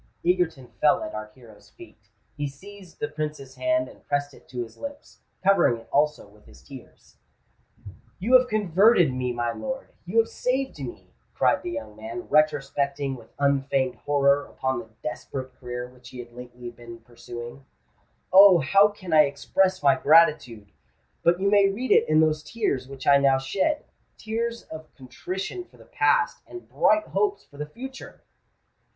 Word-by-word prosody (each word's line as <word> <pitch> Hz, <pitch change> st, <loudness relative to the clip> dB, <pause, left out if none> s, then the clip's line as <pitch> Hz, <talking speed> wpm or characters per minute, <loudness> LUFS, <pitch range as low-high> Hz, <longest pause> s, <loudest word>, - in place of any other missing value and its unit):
Egerton 175 Hz, -7 st, +1 dB, 0.2 s
fell 150 Hz, -, +4 dB
at 105 Hz, -, -6 dB
our 110 Hz, 0 st, -5 dB
hero's 115 Hz, -5 st, -17 dB
feet: 350 Hz, -1 st, -17 dB, 0.3 s
he 145 Hz, -1 st, -3 dB
seized 185 Hz, +5 st, -13 dB
the 150 Hz, -, -1 dB
Prince's 150 Hz, -3 st, -6 dB
hand, 320 Hz, 0 st, 0 dB
and -, -, -16 dB
pressed 145 Hz, 0 st, -1 dB
it -, -, -19 dB
to 125 Hz, -1 st, -4 dB
his 115 Hz, -, -13 dB
lips—covering 195 Hz, -, -1 dB
it 115 Hz, -, -15 dB
also 150 Hz, -4 st, +1 dB
with 105 Hz, +1 st, -22 dB
his 65 Hz, 0 st, -17 dB
tears. -, -, -15 dB, 1.0 s
"You 225 Hz, +7 st, -1 dB
have 255 Hz, 0 st, +7 dB
converted 200 Hz, -, +3 dB
me, 125 Hz, -1 st, -2 dB
my 120 Hz, -1 st, -2 dB
lord—you 265 Hz, -, -6 dB
have 225 Hz, 0 st, +5 dB
saved 265 Hz, +2 st, -2 dB
me!" -, -, -9 dB, 0.2 s
cried -, -, +2 dB
the 355 Hz, -, -5 dB
young 295 Hz, -5 st, -6 dB
man, 345 Hz, +2 st, -7 dB
retrospecting 140 Hz, -, 0 dB
with 115 Hz, -3 st, -15 dB
unfeigned 140 Hz, -2 st, +1 dB
horror 140 Hz, 0 st, +1 dB
upon 130 Hz, -2 st, -2 dB
the 115 Hz, -1 st, -10 dB
desperate 130 Hz, +1 st, -6 dB
career 125 Hz, -1 st, -6 dB
which 125 Hz, -1 st, -16 dB
he 130 Hz, -, -11 dB
had 120 Hz, -1 st, -9 dB
lately 125 Hz, 0 st, -9 dB
been 115 Hz, -1 st, -12 dB
pursuing: 120 Hz, +2 st, -10 dB, 0.7 s
"Oh! 195 Hz, -1 st, +9 dB
how 195 Hz, +8 st, +5 dB
can 190 Hz, -5 st, -7 dB
I 155 Hz, -1 st, +7 dB
express 185 Hz, +6 st, 0 dB
my 140 Hz, -1 st, +6 dB
gratitude? 135 Hz, -10 st, +3 dB, 0.5 s
But 170 Hz, +1 st, +3 dB
you 195 Hz, -, 0 dB
may 200 Hz, -1 st, +5 dB
read 240 Hz, +7 st, -3 dB
it -, -, +4 dB
in 155 Hz, 0 st, +5 dB
those 155 Hz, -1 st, +2 dB
tears 150 Hz, -, -2 dB
which 135 Hz, -1 st, -10 dB
I 140 Hz, -, +6 dB
now 135 Hz, -1 st, +4 dB
shed—tears 230 Hz, -, -3 dB
of 155 Hz, -1 st, -11 dB
contrition 185 Hz, -, -6 dB
for -, -, -23 dB
the -, -, -17 dB
past, -, -, +1 dB
and 360 Hz, -, -10 dB
bright 320 Hz, -, +2 dB
hopes 410 Hz, -1 st, 0 dB
for 145 Hz, -, -18 dB
the 150 Hz, +1 st, -5 dB
future!" 265 Hz, -, -10 dB
150 Hz, 165 wpm, -25 LUFS, 130-200 Hz, 1.0 s, Oh